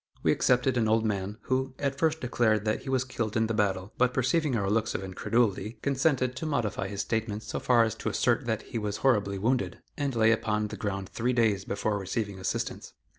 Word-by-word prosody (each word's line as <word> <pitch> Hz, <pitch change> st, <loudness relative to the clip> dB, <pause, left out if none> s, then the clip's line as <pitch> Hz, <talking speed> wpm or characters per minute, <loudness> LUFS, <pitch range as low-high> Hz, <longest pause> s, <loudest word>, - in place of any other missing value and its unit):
We -, -, +4 dB
accepted 125 Hz, +1 st, +2 dB
an 115 Hz, -2 st, +2 dB
old 110 Hz, +1 st, +2 dB
man, 100 Hz, 0 st, -2 dB
who, 130 Hz, 0 st, -1 dB
at 140 Hz, -1 st, -2 dB
first 160 Hz, 0 st, +1 dB
declared 110 Hz, -4 st, +1 dB
that 110 Hz, -, 0 dB
he 135 Hz, -, -7 dB
was 130 Hz, -1 st, +2 dB
killed 115 Hz, -4 st, -3 dB
in 110 Hz, -, +3 dB
the 115 Hz, -, -1 dB
battle, 100 Hz, -2 st, 0 dB
but 125 Hz, 0 st, +3 dB
perceiving 135 Hz, +2 st, +1 dB
our 100 Hz, -3 st, 0 dB
looks 110 Hz, +2 st, 0 dB
of -, -, -2 dB
incredulity, 105 Hz, +2 st, 0 dB
consented 135 Hz, -2 st, +1 dB
to 160 Hz, -, -4 dB
modify 115 Hz, -9 st, -1 dB
his 100 Hz, 0 st, -3 dB
statement 110 Hz, -1 st, -2 dB
so -, -, -4 dB
far 120 Hz, -2 st, +4 dB
as 110 Hz, -2 st, 0 dB
to -, -, -2 dB
assert -, -, +1 dB
that 110 Hz, -1 st, -1 dB
he 115 Hz, -, -4 dB
was 105 Hz, -1 st, -2 dB
horribly 100 Hz, -6 st, +3 dB
wounded, 120 Hz, +6 st, 0 dB, 0.2 s
and 140 Hz, -3 st, -1 dB
lay 110 Hz, 0 st, +5 dB
upon 105 Hz, -1 st, 0 dB
the -, -, -6 dB
ground 100 Hz, -4 st, -3 dB
three 120 Hz, +5 st, -1 dB
days 110 Hz, -5 st, +2 dB
before 105 Hz, +1 st, -1 dB
receiving 100 Hz, +1 st, -3 dB
assistance. 95 Hz, -, -3 dB
110 Hz, 215 wpm, -28 LUFS, 105-125 Hz, 0.2 s, lay